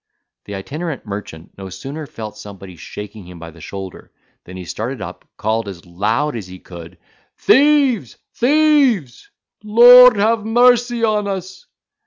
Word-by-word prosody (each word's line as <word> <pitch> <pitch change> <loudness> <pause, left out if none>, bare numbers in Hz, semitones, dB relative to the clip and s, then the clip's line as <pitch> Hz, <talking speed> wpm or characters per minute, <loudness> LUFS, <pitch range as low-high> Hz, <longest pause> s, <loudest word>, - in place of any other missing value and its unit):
The 100 - -7
itinerant 150 - -6
merchant 100 -6 -9
no 95 -1 -8
sooner 140 - -8
felt 110 -4 -9
somebody 95 -3 -12
shaking 105 +3 -10
him 90 -1 -12
by 85 0 -10
the 85 0 -17
shoulder, 95 +2 -9 0.3
than 90 +1 -11
he 90 - -8
started 115 +8 -5
up, 95 - -9
called, 110 0 -2
as 95 -3 -10
loud 110 +11 -2
as 105 -5 -7
he 90 0 -11
could, 85 -1 -13 0.4
"Thieves, 270 - +2 0.2
thieves! 280 - +1 0.3
Lord 245 +3 +8
have 220 +2 +1
mercy 240 +1 +2
upon 210 -2 0
us!" 190 - -7
130 Hz, 145 wpm, -18 LUFS, -, 0.4 s, Lord